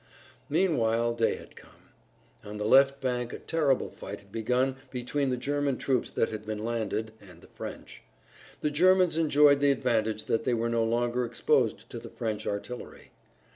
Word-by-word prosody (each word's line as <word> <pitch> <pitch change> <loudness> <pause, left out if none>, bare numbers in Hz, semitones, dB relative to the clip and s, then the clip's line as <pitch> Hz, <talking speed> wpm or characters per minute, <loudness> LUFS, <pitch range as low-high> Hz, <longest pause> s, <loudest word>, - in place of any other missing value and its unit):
Meanwhile 120 -9 +2
day 115 -1 +1
had - - -13
come. - - -18 0.5
On 105 +1 -7
the 105 - -3
left 135 +4 +5
bank 125 -2 -2
a - - -4
terrible 150 -5 0
fight - - -8
had 100 -1 -23
begun 125 +4 0
between 130 +2 -2
the 125 - -1
German 140 +1 -1
troops 130 -3 0
that 115 - 0
had 110 -1 -6
been 110 0 -4
landed, 110 -1 -2
and 90 -4 -15
the - - -16
French. - - -9 0.6
The 150 - 0
Germans 180 +2 +4
enjoyed 150 -3 +5
the 145 0 +3
advantage 110 -5 0
that 115 - 0
they 125 - +1
were 115 +1 -1
no 115 -1 +1
longer 120 +2 0
exposed 120 -1 0
to - - -6
the - - -10
French 110 -2 -4
artillery. 110 +5 -6
120 Hz, 175 wpm, -28 LUFS, 110-140 Hz, 0.6 s, left